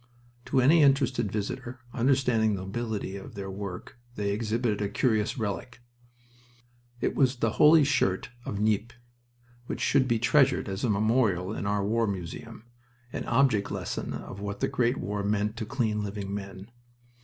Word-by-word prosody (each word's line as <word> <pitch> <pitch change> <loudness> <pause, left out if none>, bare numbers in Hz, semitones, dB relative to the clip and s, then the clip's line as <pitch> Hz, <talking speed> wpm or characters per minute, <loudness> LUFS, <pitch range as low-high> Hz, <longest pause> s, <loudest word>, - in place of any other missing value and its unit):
To 135 - +1
any 150 +6 +6
interested 135 -6 +3
visitor, 120 +4 -4
understanding 120 -4 +2
the 95 - -5
nobility 105 -1 -4
of 100 +3 -10
their 95 -1 -5
work, 100 +3 -7 0.2
they 100 -1 -1
exhibited 110 0 -1
a 100 - 0
curious 110 -3 +1
relic. 110 +2 -4 1.2
It - - +1
was 130 -1 +2
the 115 -3 0
Holy 155 +1 +8
Shirt 110 -8 +1
of 100 - -4
Nieppe, 110 +2 +1 0.7
which - - -4
should 135 -2 +3
be 120 -2 +2
treasured 135 +2 +3
as 95 +1 -4
a 125 - +1
memorial 105 -3 +2
in 100 - -3
our 100 -1 0
War 115 +2 +1
Museum 95 +3 -6 0.5
an - - -4
object 120 -5 +2
lesson - - -4
of 100 - -7
what 100 0 -5
the - - +1
great 125 +2 +1
war 100 +2 -3
meant 105 +1 0
to 110 -2 -4
clean 110 -4 -1
living 100 -1 -5
men. 100 +1 -7
110 Hz, 160 wpm, -28 LUFS, 100-125 Hz, 1.2 s, Holy